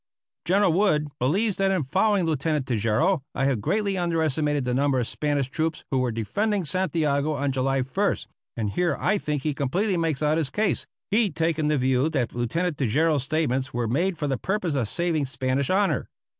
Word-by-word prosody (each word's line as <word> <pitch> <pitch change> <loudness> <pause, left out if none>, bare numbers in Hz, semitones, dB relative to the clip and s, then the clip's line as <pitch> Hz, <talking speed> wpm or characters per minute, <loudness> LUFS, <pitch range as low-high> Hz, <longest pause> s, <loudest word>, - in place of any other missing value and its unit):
General 190 -1 +3
Wood 155 -6 +2
believes 190 - +1
that 195 0 +2
in 190 -5 +1
following 190 +7 +2
Lieutenant 150 -2 0
Tejeiro 125 - +1
I 135 - +1
have 135 -6 +1
greatly 200 - 0
underestimated 155 -4 0
the 125 - 0
number 135 0 +2
of 120 - 0
Spanish 145 -3 -1
troops 160 +1 -2
who 135 - +2
were 125 -1 0
defending 200 - -1
Santiago 155 -4 0
on 140 0 -1
July 135 0 0
1st, 130 0 -1 0.3
and 105 -3 -1
here 175 - 0
I 205 +2 +1
think 150 -5 -3
he 150 - 0
completely 180 +9 0
makes 160 -3 0
out 150 +2 +2
his 150 -5 -1
case, 210 +6 -1 0.2
he 215 0 +3
taking 160 -3 0
the 150 0 +2
view 130 +3 +2
that 130 -7 -1
Lieutenant 150 +8 -1
Tejeiro's 145 +4 +2
statements 135 -3 -1
were 120 -1 0
made 170 - 0
for 150 - -2
the 135 -2 -1
purpose 190 -4 -1
of 130 -6 0
saving 165 -1 0
Spanish 130 0 -1
honor. 190 -6 +1
150 Hz, 185 wpm, -25 LUFS, 130-175 Hz, 0.3 s, General